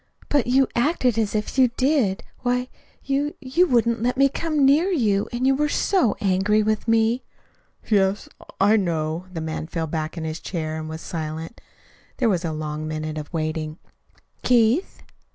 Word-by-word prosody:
"But 285 Hz, -5 st, +2 dB
you 260 Hz, +1 st, +4 dB
acted 250 Hz, -3 st, +1 dB
as 215 Hz, -1 st, 0 dB
if 215 Hz, +5 st, -2 dB
you 255 Hz, -, +7 dB
did. 260 Hz, -8 st, +1 dB, 0.2 s
Why, 250 Hz, 0 st, -1 dB, 0.3 s
you 285 Hz, +2 st, -1 dB
you 300 Hz, +7 st, +2 dB
wouldn't 235 Hz, -4 st, +2 dB
let 250 Hz, +2 st, 0 dB
me 275 Hz, +1 st, +5 dB
come 305 Hz, -1 st, 0 dB
near 300 Hz, +7 st, +4 dB
you, 215 Hz, -, +1 dB
and 245 Hz, +1 st, -1 dB
you 270 Hz, -, +5 dB
were 300 Hz, +2 st, +1 dB
so 345 Hz, -, +1 dB
angry 205 Hz, +2 st, +2 dB
with 215 Hz, +1 st, -1 dB
me." 225 Hz, +2 st, +2 dB, 0.7 s
"Yes, 200 Hz, -1 st, +2 dB, 0.3 s
I 205 Hz, +3 st, +5 dB
know." 165 Hz, -2 st, -1 dB
The 165 Hz, -3 st, -5 dB
man 160 Hz, 0 st, -4 dB
fell 165 Hz, -1 st, -3 dB
back 155 Hz, +1 st, -4 dB
in 165 Hz, -, -4 dB
his 160 Hz, 0 st, -4 dB
chair 155 Hz, -3 st, -4 dB
and 155 Hz, 0 st, -6 dB
was 160 Hz, 0 st, -6 dB
silent. 160 Hz, +4 st, -6 dB, 0.6 s
There 245 Hz, -4 st, +2 dB
was 180 Hz, -4 st, 0 dB
a 165 Hz, -, -2 dB
long 155 Hz, 0 st, -4 dB
minute 155 Hz, 0 st, -4 dB
of 150 Hz, -, -9 dB
waiting. 155 Hz, -1 st, -3 dB, 0.6 s
"Keith." 245 Hz, -, +2 dB
215 Hz, 170 wpm, -23 LUFS, 160-255 Hz, 0.7 s, you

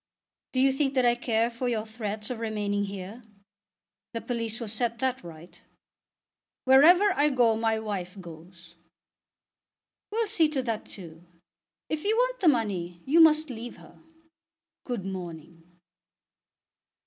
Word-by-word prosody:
Do 260 Hz, -, 0 dB
you 270 Hz, +1 st, +4 dB
think 270 Hz, 0 st, -1 dB
that 255 Hz, -1 st, +3 dB
I 240 Hz, -, +5 dB
care 235 Hz, -1 st, 0 dB
for 245 Hz, +1 st, -3 dB
your 220 Hz, -2 st, -1 dB
threats 215 Hz, 0 st, -5 dB
of 240 Hz, -, -4 dB
remaining 205 Hz, -2 st, -1 dB
here? 200 Hz, +4 st, -8 dB, 0.9 s
The 230 Hz, -, -4 dB
police 230 Hz, -2 st, -3 dB
will 230 Hz, -, -5 dB
set 230 Hz, +2 st, -1 dB
that 260 Hz, -1 st, -2 dB
right." 170 Hz, 0 st, -12 dB, 1.0 s
"Wherever 340 Hz, +10 st, +7 dB
I 295 Hz, -3 st, +3 dB
go, 240 Hz, -5 st, +3 dB
my 225 Hz, 0 st, 0 dB
wife 200 Hz, -3 st, -5 dB
goes." 170 Hz, 0 st, -13 dB, 1.4 s
"We'll 450 Hz, +2 st, 0 dB
see 360 Hz, -7 st, +3 dB
to 275 Hz, -4 st, -2 dB
that 225 Hz, -3 st, -3 dB
too. 170 Hz, -4 st, -10 dB, 0.6 s
If 310 Hz, -1 st, -3 dB
you 430 Hz, +2 st, +2 dB
want -, -, +1 dB
the 370 Hz, -, +2 dB
money, 185 Hz, -, 0 dB
you 310 Hz, +5 st, +3 dB
must 310 Hz, -2 st, +5 dB
leave 235 Hz, 0 st, -8 dB
her. -, -, -17 dB, 0.9 s
Good 240 Hz, -7 st, -4 dB
morning." 170 Hz, -3 st, -7 dB
230 Hz, 140 wpm, -27 LUFS, 195-265 Hz, 1.4 s, Wherever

